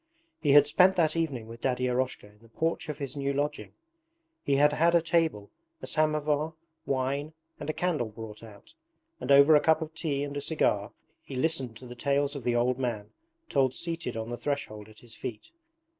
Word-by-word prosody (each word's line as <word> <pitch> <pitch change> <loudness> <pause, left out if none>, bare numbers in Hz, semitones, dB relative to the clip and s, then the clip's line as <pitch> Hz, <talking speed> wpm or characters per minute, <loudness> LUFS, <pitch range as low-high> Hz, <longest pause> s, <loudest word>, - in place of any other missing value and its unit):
He 145 -3 +3
had 145 0 +8
spent 185 +6 +4
that 160 -3 +2
evening 145 -9 -2
with 115 +1 -11
Daddy 125 -1 0
Eroshka 125 -2 -1
in 105 0 -19
the 115 - -19
porch 160 +5 -2
of 150 - -4
his 140 -3 -5
new 140 -1 -1
lodging. 145 +1 -3 0.7
He 140 - +1
had 145 +2 +4
had 170 +3 +3
a 170 - +5
table, 160 - 0 0.3
a - - -7
samovar, 155 0 0 0.3
wine, 140 +3 -1 0.3
and 145 - -6
a - - 0
candle 155 -11 -1
brought 110 0 -9
out, 110 - -14 0.5
and - - -2
over 140 +3 +8
a - - +7
cup 160 +1 +4
of 160 -1 -6
tea 145 -3 -2
and 145 0 -5
a 145 - -2
cigar 115 -8 0 0.3
he 135 - -9
listened 130 -5 -1
to 125 - -12
the 120 - -8
tales 140 +3 0
the 125 -4 -1
old 125 +2 +1
man 110 -5 -3 0.4
told 130 -2 +1
seated 165 -8 -3
on 110 +1 -4
the 120 - -3
threshold 110 -6 -4
at 110 - -16
his 120 -2 -11
feet. 115 -5 -7
140 Hz, 200 wpm, -28 LUFS, 120-155 Hz, 0.7 s, had